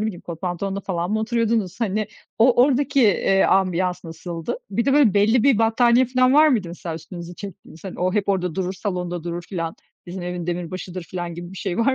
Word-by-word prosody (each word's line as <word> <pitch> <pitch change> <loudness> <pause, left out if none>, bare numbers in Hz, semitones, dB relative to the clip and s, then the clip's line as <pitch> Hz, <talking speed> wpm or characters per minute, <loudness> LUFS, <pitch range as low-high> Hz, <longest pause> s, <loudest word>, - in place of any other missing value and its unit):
bileyim, 190 -5 -5
kot 165 -2 -8
pantolonla 190 +2 -3
falan 180 -2 -3
mı 215 - +1
oturuyordunuz? 225 -3 0
Hani, 215 -1 0 0.3
o 240 +1 +5
oradaki, 275 +1 +2
eee, 195 -2 +3
ambiyans 185 -1 +1
nasıldı? 165 0 -5
Bir 230 +4 0
de 275 - +2
böyle, 275 -8 +5
belli 215 +4 +4
bir 270 -4 +4
battaniye 235 +2 +4
filan 255 +1 +3
var 310 +1 +7
mıydı 220 - +1
mesela, 170 -1 -6
üstünüzü 170 +2 -8
çektiğiniz? 190 -3 -11
Hani 190 - -7
o 185 +1 +1
hep 205 -2 0
orada 180 -4 0
durur, 185 0 -2
salonda 180 -3 -4
durur 175 0 -4
filan; 165 -3 -4 0.3
bizim 180 +1 -6
evin 175 -1 -4
demirbaşıdır 180 +1 -4
filan 175 0 -5
gibi 175 +2 -8
bir - - -10
şey 190 -3 -3
var 260 +3 +3
190 Hz, 200 wpm, -22 LUFS, 175-225 Hz, 0.3 s, var